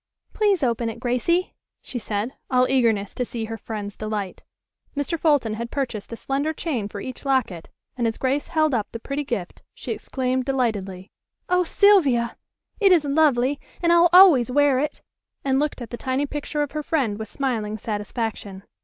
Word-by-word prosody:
"Please 405 -7 +2
open 235 -2 0
it, 225 +1 -7
Gracie!" 255 +9 0 0.3
she 245 - -5
said, 215 +3 -3 0.2
all 255 -1 +3
eagerness 230 -6 +1
to 250 - -2
see 230 -2 -4
her 225 +1 -5
friend's 210 -2 -6
delight. 215 -3 -4 0.5
Mr. 290 +4 -1
Fulton 290 -9 +2
had 235 +2 -4
purchased 245 -7 -4
a - - -4
slender 280 +6 -2
chain 275 -11 -3
for 205 0 -7
each 255 -2 -7
locket, 255 -12 -1 0.3
and 240 -2 0
as 225 - -2
Grace 270 +2 0
held 310 -3 +1
up 220 -4 -1
the 230 - -6
pretty 275 +5 -3
gift 200 -10 -4
she - - -6
exclaimed 260 -1 -2
delightedly: 210 -8 -2 0.4
"Oh, 360 0 +3
Sylvia! 325 - +4 0.4
It 400 -3 +5
is 335 -5 +5
lovely, 280 -2 +2 0.2
and 340 -1 +3
I'll 345 0 +6
always 350 -10 +7
wear 280 0 +3
it," 295 +2 -3 0.4
and 265 -1 +2
looked 290 -4 -2
at 230 - -10
the 240 - -4
tiny 260 +3 -1
picture 295 +1 -3
of 290 - -5
her 305 - -3
friend 260 -9 -1
with 220 - -5
smiling 220 -5 -2
satisfaction. 210 -2 -4
255 Hz, 180 wpm, -23 LUFS, 225-290 Hz, 0.5 s, always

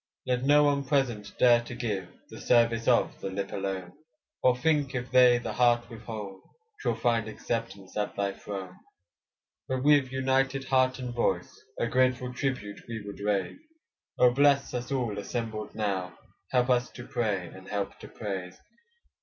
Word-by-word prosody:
Let 125 -1 0
no 145 +2 +5
one 140 -1 +2
present, 130 -7 0
dare 120 -1 +6
to 120 +1 -8
give, 105 -7 -3 0.2
The - - -9
service 115 -1 +3
of - - +2
the 95 - -3
lip 95 +1 -4
alone; 95 -2 -4 0.5
Or 125 -1 +4
think 145 -1 +1
if 125 0 -4
they 125 -1 +7
the 120 - -4
heart 120 -1 +3
withhold, 110 -4 -7 0.4
'Twill - - 0
find 115 -2 +1
acceptance 110 -3 -5
at 105 -1 -2
thy 100 -1 0
throne. 95 -3 -7 0.9
But 130 0 -2
with 145 -3 +4
united 135 +1 +1
heart 130 -1 +2
and 125 -2 -5
voice, 120 - 0 0.2
A - - +1
grateful 125 +1 +1
tribute 125 -6 -3
we 115 -3 -5
would 100 0 -8
raise; 100 - -1 0.6
Oh 125 - +6
bless 140 +1 +3
us 125 +1 -4
all 120 -7 -1
assembled 110 0 -4
now, 95 -4 -2 0.3
Help 125 0 +2
us 125 0 +2
to 120 - -9
pray, 100 -7 -1
and 95 +2 -13
help 100 -1 -3
to - - -10
praise. 95 -4 -5
120 Hz, 160 wpm, -28 LUFS, 100-130 Hz, 0.9 s, they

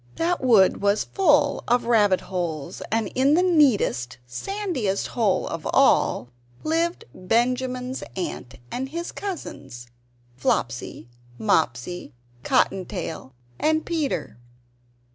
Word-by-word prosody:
That 345 +2 0
wood 220 -8 +5
was 200 +1 +2
full 295 -6 +2
of 245 +1 +2
rabbit 210 -5 +3
holes; 170 -6 -4
and 225 -1 +1
in 275 +3 +3
the 360 - +3
neatest, 230 - +2
sandiest 255 - -2
hole 205 -6 +1
of 165 -2 -5
all 120 +2 +3 0.3
lived 330 +2 0
Benjamin's 250 +5 -1
aunt 135 -8 -5 0.2
and 265 +2 -3
his 335 +3 -4
cousins 135 - -7 0.5
Flopsy, 120 -2 -2 0.3
Mopsy, 125 +6 -1 0.3
Cotton 190 -1 +2
tail, 160 -8 -6 0.2
and 315 +1 +1
Peter. 290 - -2
225 Hz, 105 wpm, -24 LUFS, -, 0.5 s, wood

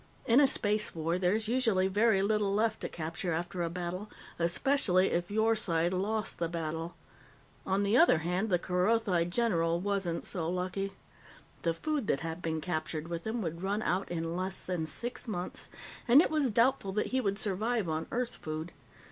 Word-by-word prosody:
In 245 +1 +5
a 285 - +6
space 210 -5 0
war, 165 +2 -1
there's 205 +4 +1
usually 225 -6 +2
very 205 0 +3
little 210 -1 +1
left 220 +2 +1
to - - -3
capture 165 +2 -3
after 175 +2 -3
a 170 - 0
battle 180 +4 -4 0.3
especially 185 +1 +3
if 175 0 -1
your 220 +2 +2
side 170 -4 +1
lost 210 +4 -2
the 170 -1 0
battle. 165 0 -4 0.7
On 195 +1 +1
the 200 +3 +2
other 295 - +6
hand, 180 +7 -1
the 180 - +3
Kerothi 180 0 +1
general 170 -4 +1
wasn't 195 -3 -2
so 165 -4 -2
lucky. 185 +2 -2 0.7
The 165 -1 0
food 290 - -2
that 135 - +1
had 165 +1 -5
been 160 -2 -2
captured 155 -1 -3
with 170 +3 -4
him 225 0 -2
would 170 0 -4
run 200 +3 -1
out 185 +2 0
in 165 -1 -3
less 185 +1 -4
than 175 -4 -2
six 245 +9 -3
months, 180 -5 -5 0.4
and 245 +4 +8
it 320 - +3
was 300 -4 +2
doubtful 230 -3 +2
that 210 - 0
he 260 - +2
would 200 -3 -1
survive 215 +1 0
on 160 0 -2
Earth 245 0 -2
food. 155 +2 -5
185 Hz, 180 wpm, -31 LUFS, 170-220 Hz, 0.7 s, and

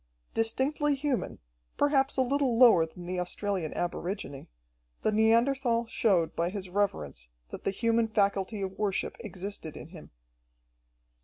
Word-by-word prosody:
Distinctly 280 +6 +1
human, 275 -2 -2 0.4
perhaps 275 -2 +2
a 260 - +4
little 265 -2 +1
lower 225 -10 +7
than 175 +2 -11
the 180 +1 -3
Australian 180 -2 -2
aborigine, 175 -5 -4 0.6
the - - +2
Neanderthal 230 +2 +3
showed 195 -7 +1
by 170 +1 0
his 190 -1 -6
reverence 75 - -1 0.2
that - - -8
the - - +2
human 230 +3 +1
faculty 200 -1 0
of 190 0 -5
worship 205 -3 -1
existed 195 -6 -6
in 155 - -10
him. 170 -3 -12
205 Hz, 135 wpm, -29 LUFS, 180-240 Hz, 0.6 s, lower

